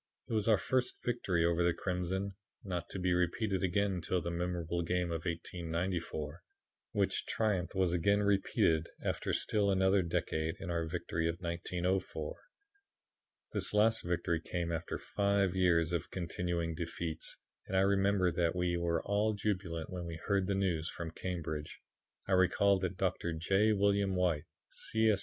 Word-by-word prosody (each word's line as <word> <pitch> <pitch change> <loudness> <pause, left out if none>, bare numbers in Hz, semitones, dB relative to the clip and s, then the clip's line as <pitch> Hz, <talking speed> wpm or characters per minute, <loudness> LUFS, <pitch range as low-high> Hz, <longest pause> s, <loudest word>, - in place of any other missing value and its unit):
It - - -4
was 110 -1 +1
our 110 -2 +6
first 130 +5 -1
victory 95 -8 +1
over 85 0 +2
the 85 -1 +2
Crimson, 95 +2 -2 0.3
not 90 -4 -4
to - - -5
be 90 -1 +1
repeated 95 +3 +1
again 100 +2 +2
until 90 0 -1
the 85 0 -3
memorable 85 -1 -2
game 90 0 0
of 80 0 -3
1894, 85 -2 -3 0.5
which - - 0
triumph 100 -6 0
was 95 -2 +2
again 100 +4 +3
repeated, 95 -5 +2
after - - -1
still 105 -2 +2
another 95 0 +4
decade, 80 -2 -1
in 85 - -4
our 85 -1 0
great 80 - -7
victory 85 -1 -1
of 85 - -1
1904. 90 - -2 1.2
This - - +1
last 110 +2 +4
victory 85 -1 0
came 85 0 -3
after 85 0 -3
five 100 -2 +1
years 85 -2 +3
of 85 0 -1
continuing 85 -1 -2
defeats, 80 0 -3 0.3
and 95 - 0
I - - +5
remember 100 -1 +3
that 85 0 +1
we 90 -1 +1
were 85 -1 0
all 105 +2 +1
jubilant 90 -6 -2
when 90 -2 -4
we 85 - -5
heard 100 -2 +2
the 100 - +1
news 90 -5 0
from 85 -2 -5
Cambridge. 80 -4 -4 0.5
I - - -3
recall 95 +2 +4
that 95 0 -2
Dr. 90 -3 0
J. 95 +7 +3
William 100 -1 +2
White, 85 -4 +1 0.3
C. 110 0 +2
S. 100 - +1
90 Hz, 160 wpm, -33 LUFS, 85-100 Hz, 1.2 s, our